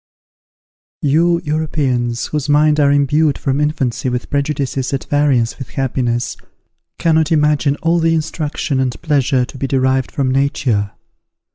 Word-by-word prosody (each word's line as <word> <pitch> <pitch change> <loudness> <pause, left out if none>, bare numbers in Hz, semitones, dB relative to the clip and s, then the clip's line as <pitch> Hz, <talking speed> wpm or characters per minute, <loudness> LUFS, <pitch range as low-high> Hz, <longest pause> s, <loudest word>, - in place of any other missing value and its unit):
You 170 +4 +2
Europeans, 140 -6 -1
whose 150 -1 -3
minds 150 +1 +4
are 140 -1 +4
imbued 145 +1 +2
from 135 +1 -1
infancy 135 -4 -1
with 125 0 -4
prejudices 140 -2 -1
at 135 - -4
variance 140 -6 +1
with 135 - -7
happiness, 125 -3 -2 0.6
cannot 160 -2 +2
imagine 150 -2 +2
all 170 +1 +2
the 165 0 +2
instruction 150 -2 -2
and 130 -2 -1
pleasure 135 -5 +1
to 130 - -12
be 135 - -1
derived 130 -1 +1
from 135 -2 -1
nature. 125 -7 0
140 Hz, 135 wpm, -17 LUFS, 130-150 Hz, 0.6 s, minds